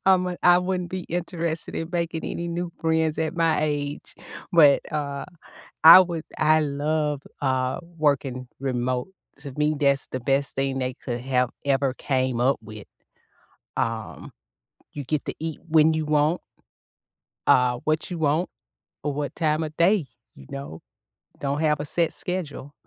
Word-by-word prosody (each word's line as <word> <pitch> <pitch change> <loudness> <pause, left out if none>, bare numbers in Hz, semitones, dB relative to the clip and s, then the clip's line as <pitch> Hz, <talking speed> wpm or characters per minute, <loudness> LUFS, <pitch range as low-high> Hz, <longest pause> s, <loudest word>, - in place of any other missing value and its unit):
I'm 185 -1 +5
a 180 -1 -3
I 175 0 +7
wouldn't 180 -1 -2
be 185 -1 -4
interested 170 -1 -3
in 165 - -3
making 170 -2 -2
any 170 0 -4
new 170 0 -3
friends 160 -1 +1
at 160 -1 -1
my 165 -2 +2
age, 145 -1 -3 0.4
but, 150 -5 +6
uh, 140 -2 -3 0.6
I 165 +3 +12
would 170 -3 0
I 155 0 +4
love, 150 0 -1 0.2
uh, 130 -2 0 0.2
working 135 -4 0
remote. 125 +1 -1 0.3
To 140 0 -7
me, 150 +1 +2
that's 140 -2 +2
the 130 - -2
best 135 +3 0
thing 135 0 -1
they 130 0 -2
could 120 0 -5
have 125 0 +1 0.2
ever 135 -1 +2
came 130 -3 -1
up 130 +3 +3
with. 110 -1 -11 0.9
Um, - - -3 0.6
you 145 - -5
get 150 +2 -2
to - - -3
eat 160 -1 -5
when 160 0 +5
you 155 -1 -1
want 150 +3 +2 1.1
uh, 125 -1 +4
what 155 +3 0
you 175 - -3
want, 155 +3 +1 0.5
or 145 0 -1
what 145 0 -4
time 155 -1 +1
of 155 -1 -6
day, 175 -2 +3 0.3
you - - -14
know? 140 - -7 0.6
Don't 140 +1 -1
have 150 -2 +2
a 145 - -3
set 170 +2 0
schedule. 150 -6 -4
150 Hz, 155 wpm, -24 LUFS, 135-165 Hz, 1.1 s, I